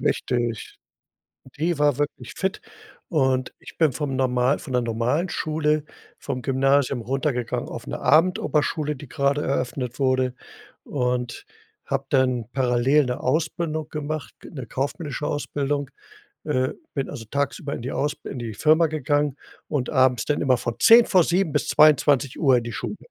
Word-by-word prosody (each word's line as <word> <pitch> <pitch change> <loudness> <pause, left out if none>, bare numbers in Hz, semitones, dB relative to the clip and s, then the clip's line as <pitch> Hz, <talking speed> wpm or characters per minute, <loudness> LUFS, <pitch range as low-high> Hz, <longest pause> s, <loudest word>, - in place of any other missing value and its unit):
Richtig. 120 -3 -1 0.8
Die 165 +1 0
war 145 -2 +2
wirklich 145 0 -3
fit. 190 +2 -2 0.5
Und 130 -5 +1
ich - - -13
bin 155 -5 +4
vom 135 -1 -3
normal 130 +1 +2
von 135 - -8
der 125 -1 +2
normalen 120 +9 0
Schule 155 -2 0 0.3
vom 130 -3 -4
Gymnasium 135 0 +2
runtergegangen 130 -1 -2
auf - - -7
'ne - - -5
Abendoberschule, 155 -2 +2
die 135 +1 -11
grade 140 +3 0
eröffnet 125 -1 -2
wurde 130 -2 +1 0.5
und 125 -2 -2 0.4
habe 135 0 -2
dann 130 -4 +2
parallel 130 +2 +3
'ne 125 - -3
Ausbildung 155 +2 -1
gemacht, 150 -1 -5
'ne 130 -6 -8
kaufmännische 145 +3 -3
Ausbildung. 145 -1 -2 0.5
Äh, 130 -4 0 0.2
bin 135 -2 -2
also 125 -6 -7
tagsüber 140 0 -2
in - - -6
die 130 - -4
aus 145 +1 -1
in 130 - -6
die 115 -3 -5
Firma 155 +7 +4
gegangen 145 -2 0 0.3
und 140 -5 -1
abends 130 -3 +3
dann 150 - 0
immer 130 -3 +3
von 120 -1 -3
18:50 185 - +5
bis - - 0
22:00 140 -2 +4
in 115 - -4
die 120 - -5
Schule. 210 - -4
140 Hz, 145 wpm, -24 LUFS, 125-150 Hz, 0.8 s, 18:50